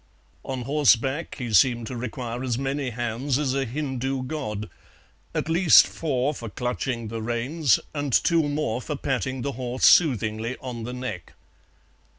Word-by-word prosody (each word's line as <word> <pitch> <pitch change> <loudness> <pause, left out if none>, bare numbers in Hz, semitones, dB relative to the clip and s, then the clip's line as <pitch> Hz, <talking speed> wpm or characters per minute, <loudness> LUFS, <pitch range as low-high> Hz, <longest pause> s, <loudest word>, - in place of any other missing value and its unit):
On 130 -2 -4
horseback 140 +1 +2
he 120 -5 -4
seemed 120 +3 +4
to 125 - -6
require 120 0 -5
as 120 -3 -1
many 135 0 -2
hands 120 +3 -2
as 140 -3 0
a 135 0 0
Hindu 130 0 -3
god, 105 -7 -4 0.7
at - - -1
least 165 +1 +7
four 145 -2 -1
for 115 -5 -7
clutching 125 0 -3
the 115 0 -4
reins, 120 +5 +1
and 145 -2 -2
two 165 +7 +4
more 145 -6 -1
for 150 - -4
patting 130 -2 -2
the 140 - -1
horse 125 0 -1
soothingly 115 - +3
on 120 -3 -6
the 125 - -5
neck. 105 -10 -6
130 Hz, 155 wpm, -25 LUFS, 120-140 Hz, 0.7 s, least